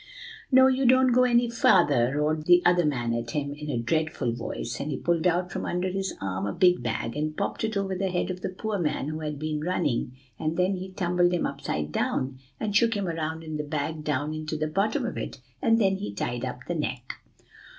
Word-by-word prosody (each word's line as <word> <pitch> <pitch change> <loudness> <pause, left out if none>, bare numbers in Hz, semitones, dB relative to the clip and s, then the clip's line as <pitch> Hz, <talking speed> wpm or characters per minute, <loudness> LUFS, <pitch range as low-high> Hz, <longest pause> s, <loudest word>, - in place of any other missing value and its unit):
"'No, 260 0 +7
you 265 0 +3
don't 260 0 +5
go 250 +1 +5
any 240 -1 +3
farther,' 140 - +4
roared 155 +1 0
the 175 0 +6
other 175 -1 +4
man 120 -5 0
at 115 0 -3
him, 140 +2 -2
in 150 +1 -7
a 130 - -1
dreadful 150 +1 0
voice; 120 0 -5
and 145 - -3
he 140 - -2
pulled 170 0 +1
out 180 +1 +1
from - - -3
under 180 +1 -1
his 195 +1 -3
arm 95 +1 -2
a - - -2
big 180 -4 +4
bag, 115 0 -2
and 155 +1 -2
popped - - -2
it 220 -2 -1
over 195 -1 -1
the 190 +1 -1
head 180 +1 -1
of 185 0 -7
the - - -2
poor 205 +2 -3
man 150 -3 -1
who 155 0 -4
had 150 -2 -4
been 155 0 -3
running, 155 -8 0 0.3
and 155 +1 -1
then 185 +2 +2
he 185 +1 -7
tumbled 175 -2 +2
him 175 - 0
upside 75 - -3
down, 130 - -1 0.2
and 210 -2 -2
shook 230 0 +4
him 200 -2 -1
around 160 -1 -3
in 155 -1 -4
the 150 - -2
bag 155 +1 -3
down 150 +1 -1
into 155 0 -4
the 155 - -1
bottom 195 +7 0
of - - -4
it, - - -6 0.2
and 230 -3 +4
then 195 -3 +3
he 105 - -5
tied 120 +4 -3
up 125 -1 -4
the 175 - -1
neck." 130 -6 -4
160 Hz, 230 wpm, -27 LUFS, 145-185 Hz, 0.3 s, No